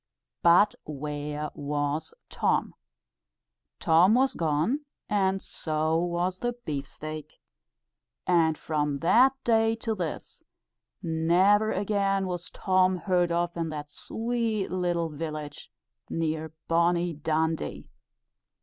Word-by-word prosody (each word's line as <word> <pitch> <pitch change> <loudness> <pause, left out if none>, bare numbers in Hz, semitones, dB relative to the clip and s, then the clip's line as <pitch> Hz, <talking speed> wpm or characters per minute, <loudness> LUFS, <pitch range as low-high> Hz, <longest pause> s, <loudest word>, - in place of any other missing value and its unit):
But 180 +5 +6
where 150 0 -4
was 145 +2 -2 0.2
Tom? - - 0 1.1
Tom 175 +7 +5
was 265 +1 +3
gone, 160 - 0 0.3
and 195 -2 +1
so 155 0 -1
was 175 +1 -1
the 240 0 -1
beef 140 -3 -3
steak! 155 +1 -8 0.9
And 165 -3 +3
from 150 -2 -1
that 245 +10 +5
day 225 -1 +3
to 225 0 -2
this, 175 -6 -5 0.6
never 180 +6 +3
again 195 -1 0
was 180 -1 -4
Tom 185 -1 +2
heard 175 0 +1
of 170 0 0
in 165 -1 -2
that 150 -1 -6
sweet 225 -1 -2
little 175 -2 0
village 150 -1 -6 0.4
near 160 -1 -2 0.2
bonnie 170 +1 +2
Dundee. 160 +1 -2
170 Hz, 105 wpm, -27 LUFS, 155-195 Hz, 1.1 s, But